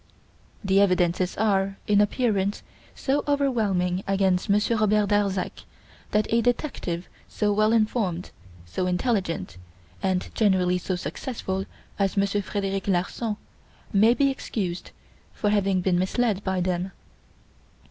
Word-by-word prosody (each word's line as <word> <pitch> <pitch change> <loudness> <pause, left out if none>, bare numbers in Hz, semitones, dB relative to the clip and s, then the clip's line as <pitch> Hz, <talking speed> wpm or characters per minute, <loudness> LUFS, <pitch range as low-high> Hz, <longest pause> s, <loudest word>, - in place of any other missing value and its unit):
The 195 0 +4
evidences 180 -1 +2
are, 195 -2 +1
in 205 -1 +4
appearance, 205 -2 0 0.3
so 280 +1 0
overwhelming 210 -11 +1
against 195 -2 +1
Monsieur 210 +3 +2
Robert 210 -1 +2
Darzac 200 -2 0 0.5
that 210 0 +2
a 230 - +4
detective 230 - -2 0.2
so 210 -1 0
well 215 +1 +3
informed, 215 -6 0 0.3
so 180 - -2
intelligent, 180 - -1 0.4
and 185 -1 -1
generally 185 -4 +2
so 185 +1 -2
successful, 190 0 -4 0.3
as 195 0 +1
Monsieur 200 +1 +2
Frederic 195 -1 -3
Larsan, 200 +4 -1 0.6
may 220 +4 +5
be 275 +2 +3
excused 190 -9 -4 0.4
for 210 - 0
having 195 -3 +2
been 180 -1 +2
misled 205 +2 0
by 190 -1 0
them. 180 +1 -1
195 Hz, 120 wpm, -25 LUFS, 185-215 Hz, 0.6 s, may